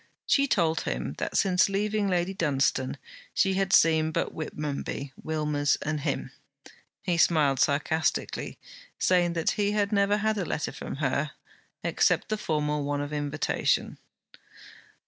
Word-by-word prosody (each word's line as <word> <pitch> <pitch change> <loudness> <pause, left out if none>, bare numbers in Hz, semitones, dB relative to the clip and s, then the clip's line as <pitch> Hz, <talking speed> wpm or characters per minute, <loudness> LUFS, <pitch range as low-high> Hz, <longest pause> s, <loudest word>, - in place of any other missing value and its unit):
She 280 0 +3
told 165 - +2
him - - -3
that - - -2
since 185 0 +3
leaving 205 +1 0
Lady 180 0 0
Dunstane 140 -7 0 0.4
she 195 - +3
had 195 0 0
seen 160 -3 +4
but - - -2
Whitmonby, 145 -3 -4
Wilmers, 150 -2 0
and 155 0 -1
him. - - -3 0.7
He 175 -2 0
smiled 150 -5 +3
sarcastically, 150 +2 0 0.4
saying 175 -2 +2 0.2
he 205 0 +1
had 205 -1 +1
never 200 0 +3
had 215 0 0
a - - 0
letter 155 - -2
from - - -6
her, 140 +1 -1 0.5
except - - +2
the 215 - 0
formal 150 -5 -1
one 145 0 -1
of 145 +1 -4
invitation. 145 0 0
160 Hz, 135 wpm, -27 LUFS, 145-195 Hz, 0.7 s, seen